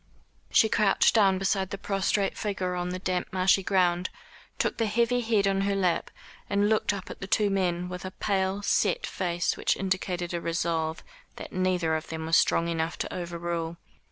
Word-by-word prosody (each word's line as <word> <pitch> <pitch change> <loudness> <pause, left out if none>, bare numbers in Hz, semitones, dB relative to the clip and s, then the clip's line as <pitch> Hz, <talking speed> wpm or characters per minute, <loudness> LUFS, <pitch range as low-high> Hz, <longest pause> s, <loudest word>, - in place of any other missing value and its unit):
She 220 - +5
crouched 210 -2 +3
down 195 -4 +4
beside 190 0 0
the 200 - -4
prostrate 195 0 0
figure 195 -4 -2
on 180 0 -2
the 180 - -3
damp 185 -1 -2
marshy 185 +1 +3
ground, 180 -3 +1 0.5
took - - 0
the 225 -1 +1
heavy 235 +3 +1
head 220 -4 +2
on 195 0 +1
her 200 0 0
lap, 185 -3 0 0.4
and 205 0 +2
looked 220 -1 +2
up 200 -2 -6
at - - -10
the 195 - -5
two 205 0 +2
men 180 -2 0
with 180 0 -6
a 185 - -4
pale 190 +1 -1
set - - +1
face 175 - -1
which - - 0
indicated 185 -2 -2
a 170 - -2
resolve 165 -1 -1 0.3
that - - -9
neither 180 -3 +1
of 160 0 -4
them 160 0 -5
was 165 +1 +2
strong 165 - +3
enough 165 0 -2
to - - -4
overrule. 170 -1 -4
185 Hz, 185 wpm, -27 LUFS, 175-200 Hz, 0.5 s, She